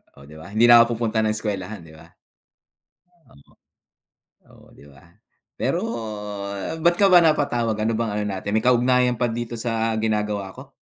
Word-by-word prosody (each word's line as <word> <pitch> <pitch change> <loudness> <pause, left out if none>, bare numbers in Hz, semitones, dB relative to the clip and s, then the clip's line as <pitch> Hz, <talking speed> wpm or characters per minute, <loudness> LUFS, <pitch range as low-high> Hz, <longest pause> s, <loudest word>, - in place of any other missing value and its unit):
oh, 70 - -16
'di 75 +2 -15
ba? 80 - -11
Hindi 120 +2 +4
na 120 - +9
ako 115 0 -3
pupunta 110 -1 -1
ng 110 - 0
eskuwelahan, 105 -2 -5
'di 80 -1 -15
ba? - - -16 1.2
Oo. 70 - -22 1.1
Oo, - - -24
'di 70 - -18
ba? 70 0 -19 0.6
Pero - - -1 1.0
ba't 170 +1 +3
ka 200 -2 +4
ba 180 - +8
napatawag, 130 -8 +1
ano 115 +1 0
bang 115 -2 -1
ano 105 - -2 0.2
natin, 100 +2 -4
may 110 - +1
kaugnayan 125 0 +2
pa 125 - +1
dito 120 0 -5
sa 115 -1 -1
ginagawa 105 -3 -2
ko? 135 +2 -13
115 Hz, 170 wpm, -22 LUFS, 105-120 Hz, 1.2 s, na